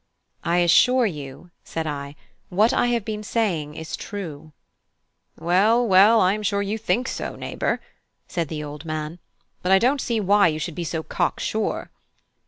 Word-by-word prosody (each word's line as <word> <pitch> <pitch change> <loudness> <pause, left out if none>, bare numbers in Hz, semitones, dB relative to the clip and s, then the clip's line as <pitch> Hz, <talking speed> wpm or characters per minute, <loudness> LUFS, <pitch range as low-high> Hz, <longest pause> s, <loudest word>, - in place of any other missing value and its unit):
"I 170 +1 +1
assure 250 +8 +5
you," 150 -2 -6
said 160 -1 -4
I, 145 -1 -5 0.3
"what 210 +6 +3
I - - +2
have 235 -4 0
been 215 -1 -4
saying 180 -10 -1
is 160 +1 -5
true." 160 -7 -7 0.9
"Well, 205 +8 +3
well, 205 +4 +6
I 185 0 +4
am 215 - -3
sure 200 -1 0
you 210 +3 -3
think 245 +3 0
so, - - -4
neighbour," - - -2 0.5
said 170 -2 -2
the 150 +1 -5
old 150 +1 -8
man, 155 +1 -4 0.4
"but 180 - 0
I 190 - +8
don't 255 +6 +2
see 230 -2 -1
why 205 -1 +4
you 155 -2 -1
should 160 +2 -4
be 175 - -4
so 160 0 -3
cocksure." - - -2
185 Hz, 170 wpm, -23 LUFS, 155-215 Hz, 0.9 s, I